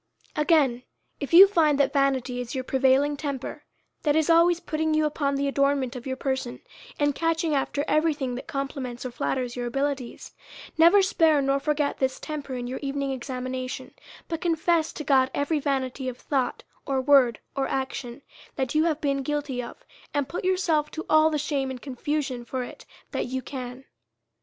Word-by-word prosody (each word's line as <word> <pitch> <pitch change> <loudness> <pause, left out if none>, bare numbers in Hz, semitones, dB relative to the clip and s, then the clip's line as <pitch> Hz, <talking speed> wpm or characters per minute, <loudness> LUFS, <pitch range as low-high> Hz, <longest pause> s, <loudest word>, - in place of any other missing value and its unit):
Again: 295 -6 +3 0.4
If 280 - -5
you 370 +4 +10
find 315 -7 +3
that 275 -1 +2
vanity 265 -3 +1
is 245 +2 -6
your 260 - -2
prevailing 265 +3 +3
temper, 285 +1 -5 0.4
that 295 -2 +2
is 315 +1 +3
always 335 +1 +5
putting 315 -1 -1
you 310 0 +3
upon 285 -2 0
the 280 0 0
adornment 275 -2 +1
of 250 +1 -7
your 260 - -2
person, 265 -2 -3 0.4
and 290 -1 +2
catching 330 +1 0
every 300 +3 +1
thing 265 -4 -3
that 245 - -7
compli 275 0 -3
ments 245 -1 -6
or 255 - -4
flatters 245 0 -2
your 245 -1 -3
abilities, 275 -1 -3 0.4
never 340 +5 +6
spare 325 -5 +3
or 275 - +2
forget 295 0 -1
this 260 -1 0
temper 290 -4 -5
in 245 -1 -4
your 255 +2 -4
evening 275 -1 -2
examination; 255 0 -5 0.3
but 330 0 -4
confess 335 -1 +1
to 300 - -6
God 265 -3 +3
every 290 +2 0
vanity 265 -2 -2
of 250 - -8
thought, 265 -3 -2 0.2
or 270 -1 +1
word, 260 -4 +4 0.2
or 275 -1 0
action, 265 -1 -4 0.3
that 260 -2 -2
you 310 +1 +3
have 315 -2 0
been 275 -2 0
guilty 285 -2 -2
of, 240 - -10 0.3
and 285 -2 +1
put 345 - -5
yourself 365 -5 +1
to 320 - -6
all 310 0 +6
the 305 - -1
shame 285 -2 -1
and 260 -1 -6
confusion 270 -1 -3
for 255 +1 -3
it - - -11 0.2
that - - -2
you 260 +1 -3
can. 255 -1 -7
275 Hz, 180 wpm, -26 LUFS, 260-305 Hz, 0.4 s, you